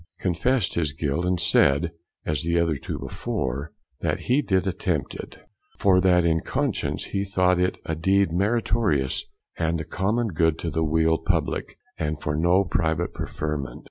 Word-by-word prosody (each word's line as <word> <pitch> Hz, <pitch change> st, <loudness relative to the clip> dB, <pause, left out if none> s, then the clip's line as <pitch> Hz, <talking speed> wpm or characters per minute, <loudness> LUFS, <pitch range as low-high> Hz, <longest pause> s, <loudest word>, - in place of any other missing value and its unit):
confessed 100 Hz, +5 st, +1 dB
his 80 Hz, -4 st, 0 dB
guilt, 75 Hz, +3 st, -1 dB
and 90 Hz, -1 st, +1 dB
said 75 Hz, +4 st, +3 dB, 0.3 s
(as 75 Hz, -3 st, -1 dB
the 85 Hz, +1 st, +1 dB
other 85 Hz, -2 st, +2 dB
two 70 Hz, -, -5 dB
before) 65 Hz, +5 st, -3 dB, 0.3 s
that -, -, -1 dB
he 130 Hz, +4 st, +2 dB
did 95 Hz, -8 st, +1 dB
attempt 90 Hz, -5 st, -1 dB
it, -, -, -8 dB, 0.4 s
for 95 Hz, -2 st, +4 dB
that 90 Hz, -2 st, +4 dB
in 80 Hz, -1 st, +3 dB
conscience -, -, -1 dB
he 100 Hz, -, -2 dB
thought 90 Hz, -2 st, +2 dB
it 90 Hz, +1 st, +1 dB
a 80 Hz, -, -2 dB
deed 95 Hz, +3 st, +2 dB
meritorious, 100 Hz, -, +1 dB, 0.4 s
and 80 Hz, 0 st, 0 dB
a -, -, -3 dB
common 110 Hz, +5 st, 0 dB
good 80 Hz, -2 st, +2 dB
to 85 Hz, -, -3 dB
the 80 Hz, +2 st, 0 dB
weal 80 Hz, +1 st, +2 dB
publick, -, -, -1 dB, 0.2 s
and 75 Hz, -1 st, -2 dB
for 75 Hz, 0 st, -2 dB
no 85 Hz, +5 st, +3 dB
private 85 Hz, -2 st, 0 dB
preferment. 75 Hz, -3 st, -4 dB
85 Hz, 165 wpm, -25 LUFS, 80-95 Hz, 0.4 s, for